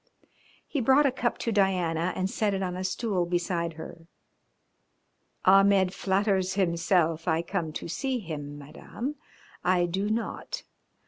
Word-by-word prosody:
He 285 - -2
brought 265 +5 +5
a 275 - +4
cup 245 -2 -1
to 230 - -2
Diana 180 -4 +1
and 185 - 0
set 205 0 0
it 195 - -2
on 180 -1 -2
a 185 - -4
stool 185 -2 -1
beside 175 -1 -1
her. 165 +1 -10 1.4
"Ahmed 195 -1 +5
flatters 190 -1 +1
himself 170 -2 +1
I 165 0 +2
come 170 -2 -2
to - - -5
see 260 - -1
him, 150 -8 -6
Madame. 225 - -6 0.5
I 180 -1 +3
do 190 +4 -1
not. 225 +1 -3
185 Hz, 140 wpm, -28 LUFS, 170-200 Hz, 1.4 s, brought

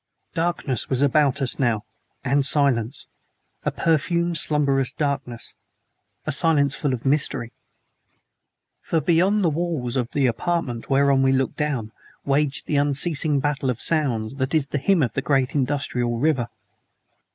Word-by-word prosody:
Darkness 165 -7 -2
was 130 +1 +1
about 140 -1 +2
us 130 - -3
now, 120 -4 0 0.4
and 140 +2 +2
silence: 135 -4 +2 0.6
a - - 0
perfumed, 170 +2 0
slumberous 140 -4 +1
darkness 140 -5 -4 0.7
a - - -1
silence 145 -4 +3
full 145 0 -2
of 125 -1 -4
mystery. 135 -4 0 1.3
For, 165 - -1
beyond 180 +6 +2
the 170 - +3
walls 150 -7 -3
of 125 -3 -1
the 140 -2 +1
apartment 125 -1 -2
whereon 135 0 +3
we 135 0 +3
looked 135 -1 0
down 135 -8 -2 0.3
waged 140 0 0
the 150 - -1
unceasing 145 +1 +2
battle 140 -1 -1
of 125 -2 -2
sounds 125 -9 0
that 130 +3 -1
is 145 -3 0
the 145 - -2
hymn 175 +3 +2
of 115 -3 -2
the - - -2
great 135 -3 0
industrial 130 -4 -1
river. 130 -3 0
140 Hz, 145 wpm, -23 LUFS, 130-150 Hz, 1.3 s, silence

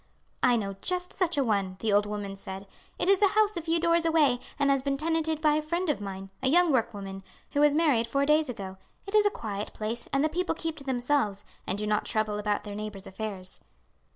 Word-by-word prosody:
"I 245 -1 +5
know 195 -4 -2
just 360 0 -2
such 345 -4 0
a 280 - +3
one," 200 -5 0
the 215 0 0
old 205 +1 +4
woman 205 -1 -4
said. 195 0 -8 0.3
"It - - -1
is 390 0 +4
a 405 - +7
house 425 -1 +4
a 340 - -2
few 330 +1 +1
doors 335 0 +3
away 305 -7 +3 0.2
and 280 -1 +3
has 275 -1 +2
been 275 0 -1
tenanted 320 0 0
by 305 -1 +4
a 305 - +2
friend 340 +2 0
of 280 - -4
mine, 195 -1 -6
a 260 - +1
young 350 +2 +5
workwoman, 205 -6 -1 0.3
who 285 - 0
was 295 0 +5
married 285 -8 +3
four 275 +4 +1
days 300 0 +3
ago 190 -5 -6 0.3
it 395 - -7
is 420 -1 +6
a - - +4
quiet 210 - -5
place, 225 +2 -4
and 275 +1 +2
the - - +4
people 350 +2 -1
keep 325 -1 -3
to 280 - -8
themselves, 245 -6 0 0.2
and 190 - -1
do 210 - -2
not 210 0 +1
trouble 215 -1 -1
about 210 0 -1
their 205 - -7
neighbours' 205 -2 -6
affairs." 190 -2 -6
260 Hz, 235 wpm, -28 LUFS, 205-320 Hz, 0.3 s, a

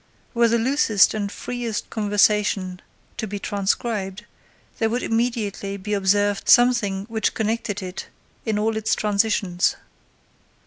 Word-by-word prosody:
Were 235 -1 +4
the 235 +1 +2
loosest 230 -4 +3
and 205 -2 -3
freest 240 -2 -4
conversation 205 -3 +1 0.4
to 220 - -3
be 205 0 -4
transcribed, 200 0 -2 0.5
there 225 - +2
would 245 +2 -2
immediately 225 -4 -1
be 210 +2 -4
observed 205 +1 +1
something 225 -6 +4
which 225 -1 -1
connected 220 -2 -2
it 185 +1 -6 0.4
in 220 -2 -1
all 220 +1 0
its 220 - +1
transitions. 200 -4 +1
210 Hz, 125 wpm, -23 LUFS, 200-225 Hz, 0.5 s, Were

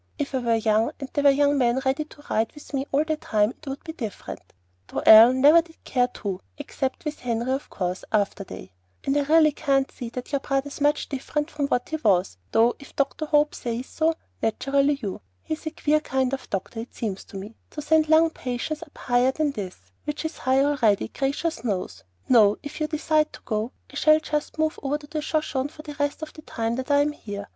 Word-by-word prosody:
"If 290 -2 -3
I 260 - +1
were 235 -2 +2
young, 220 0 +2
and 275 -1 -7
there 285 - 0
were 285 - +8
young 285 +1 +3
men 245 0 +3
ready 270 +3 +1
to 295 -1 -17
ride 220 +1 0
with 295 - -13
me 275 0 -1
all 285 +2 +3
the 315 -1 -1
time, 210 -6 +1
it 300 - -17
would 270 +1 -5
be 320 - -6
different; 225 - -6 0.5
though - - -4
Ellen 235 +4 +9
never 305 +4 +8
did 330 -1 -20
care 250 -2 +1
to, 195 -6 -5 0.2
except 275 0 -4
with 300 0 -4
Henry 235 +1 -1
of 270 +2 -2
course, 180 -1 -3
after 205 -2 0
they 95 - -10 0.3
And 275 - 0
I 290 - +3
really 305 +2 +5
can't 275 -2 +1
see 240 -3 -7
that 250 +3 -7
your 280 - +1
brother's 275 +1 -2
much 295 +1 +2
different 295 +3 -3
from 285 -2 -1
what 245 -3 -1
he 315 - -1
was, 185 - +1
though 230 +2 +4
if 280 - -14
Dr. 280 +3 -1
Hope 295 0 +3
says 240 +1 -4
so, 320 +3 0 0.3
naturally 275 +5 +1
you 195 -3 -4 0.2
He's 315 +1 -4
a - - +1
queer 305 0 +1
kind 265 -3 -1
of 270 - -5
doctor, 195 +4 -4
it 230 - -8
seems 205 -5 -3
to 195 - -9
me, 205 +4 -8
to 300 - -7
send 315 0 +3
lung 320 +1 +5
patients 260 +4 -4
up 320 -3 -12
higher 245 +1 +2
than 300 +1 0
this, 195 -7 -6 0.3
which 295 +1 -3
is 320 - -4
high 265 +1 +3
already, 240 -9 +2
gracious 280 0 -2
knows. 200 - -3 0.2
No; 215 -4 +5
if 290 +2 -7
you 305 - +1
decide 310 0 +1
to - - -10
go, 215 +2 -2 0.2
I - - -5
shall 310 +1 +5
just 300 -1 -3
move 315 0 0
over 285 +1 -1
to 300 - -13
the 305 +1 -4
Shoshone 295 -3 -1
for 305 0 -12
the 295 - -7
rest 285 +2 -1
of 310 - -7
the 310 - -11
time 230 -4 -3
that 260 +2 -4
I'm 290 +1 +3
here. 205 -8 -7
275 Hz, 225 wpm, -25 LUFS, 235-300 Hz, 0.5 s, Ellen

